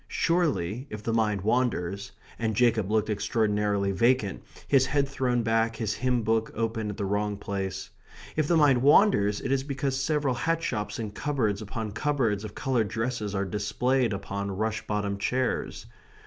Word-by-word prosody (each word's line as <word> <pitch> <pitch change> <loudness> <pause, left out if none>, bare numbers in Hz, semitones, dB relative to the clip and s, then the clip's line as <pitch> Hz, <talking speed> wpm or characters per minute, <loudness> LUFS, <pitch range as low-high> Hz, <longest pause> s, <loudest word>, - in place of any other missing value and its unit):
Surely, 135 - 0
if 105 0 -7
the 115 - -1
mind 105 -3 +1
wanders 100 -4 0 0.3
(and 110 -2 -1
Jacob 115 -4 +2
looked 110 0 +1
extraordinarily 105 -1 0
vacant, 115 +1 +1 0.3
his 130 -2 +4
head 140 -2 +1
thrown 125 -3 0
back, 115 0 +1
his 110 -2 -2
hymn 125 +2 0
book 110 0 +1
open 115 -1 -2
at 105 - -6
the 100 - -2
wrong 105 +1 -1
place), 100 -1 -4 0.4
if 155 -2 +1
the 170 - +3
mind 140 -5 +5
wanders 130 - +4
it 135 - -3
is 135 -1 +1
because 140 -1 -2
several 145 -2 +1
hat 165 +6 -1
shops 105 -7 -2
and 110 -3 -5
cupboards 115 -7 -1
upon 110 +1 -5
cupboards 115 -4 0
of 110 - -8
coloured 130 -6 0
dresses 110 -1 -3
are 100 0 0
displayed 110 +6 0
upon 100 0 -4
rush 110 +3 -2
bottomed 100 -1 -1
chairs. 125 +4 -1
110 Hz, 165 wpm, -27 LUFS, 105-130 Hz, 0.4 s, mind